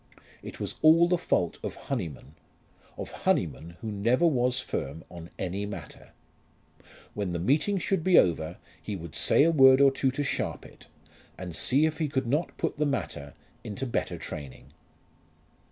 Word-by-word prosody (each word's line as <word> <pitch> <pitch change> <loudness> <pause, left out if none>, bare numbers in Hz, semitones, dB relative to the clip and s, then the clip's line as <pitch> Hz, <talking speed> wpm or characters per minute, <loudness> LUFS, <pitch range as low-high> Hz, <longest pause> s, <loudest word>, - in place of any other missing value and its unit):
It - - -9
was - - -5
all 165 +2 +6
the 175 -1 +1
fault 90 - 0
of - - -5
Honyman, 90 - -5 0.6
of - - -6
Honyman 85 +2 0
who 110 -2 -4
never 115 +10 +2
was 125 -5 +2
firm 75 - -4
on 85 -1 -9
any 95 +2 -3
matter. 90 -8 -9 1.0
When 100 -4 -3
the - - -1
meeting 150 - +1
should 185 -1 0
be 185 0 +5
over 85 -1 +2 0.2
he 105 - -5
would 85 -4 -8
say - - +4
a 165 - +4
word 135 -4 +7
or 140 -1 +6
two 135 0 0
to 140 +3 -2
Sharpit, 135 - -4 0.5
and 90 -3 -6
see 135 - +3
if 160 0 -2
he 155 - +1
could 135 -2 -1
not 145 +8 -1
put 165 - -2
the 150 - +1
matter 70 - -4 0.3
into 115 +3 -5
better 120 - -2
training. 70 -4 -8
125 Hz, 165 wpm, -28 LUFS, -, 1.0 s, word